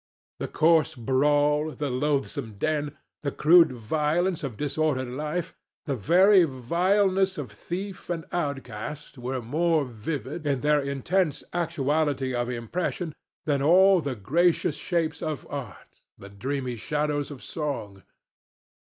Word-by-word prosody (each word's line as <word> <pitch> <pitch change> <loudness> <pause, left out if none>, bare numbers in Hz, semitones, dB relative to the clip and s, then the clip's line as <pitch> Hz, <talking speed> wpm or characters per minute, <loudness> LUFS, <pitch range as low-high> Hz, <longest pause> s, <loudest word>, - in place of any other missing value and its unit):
The - - -3
coarse 160 -1 +3
brawl, 145 +5 +2
the 145 -3 -3
loathsome 135 -3 -1
den, 150 +4 -1 0.2
the 145 - -1
crude 165 +2 +6
violence 155 - 0
of 125 -7 -4
disordered 145 -3 -1
life, 150 +6 -3 0.3
the 140 - -1
very 185 - +5
vileness 185 - +1
of 130 -8 -5
thief 185 - -6
and 165 -2 -3
outcast, 140 -2 -4
were 125 0 -3
more 155 +4 +1
vivid, 130 +5 -5
in 135 -3 0
their 150 +1 +3
intense 140 +4 0
actuality 150 -5 0
of 120 0 -1
impression, 155 +7 -3 0.3
than 145 -3 +1
all 185 +5 +6
the 140 -4 -3
gracious 160 - +2
shapes 170 -3 -1
of 155 -3 -3
art, 135 -9 -8 0.2
the 100 - -11
dreamy 125 +4 -3
shadows 150 +2 -1
of 140 -4 -9
song. 125 -11 -4
150 Hz, 125 wpm, -26 LUFS, 130-165 Hz, 0.3 s, crude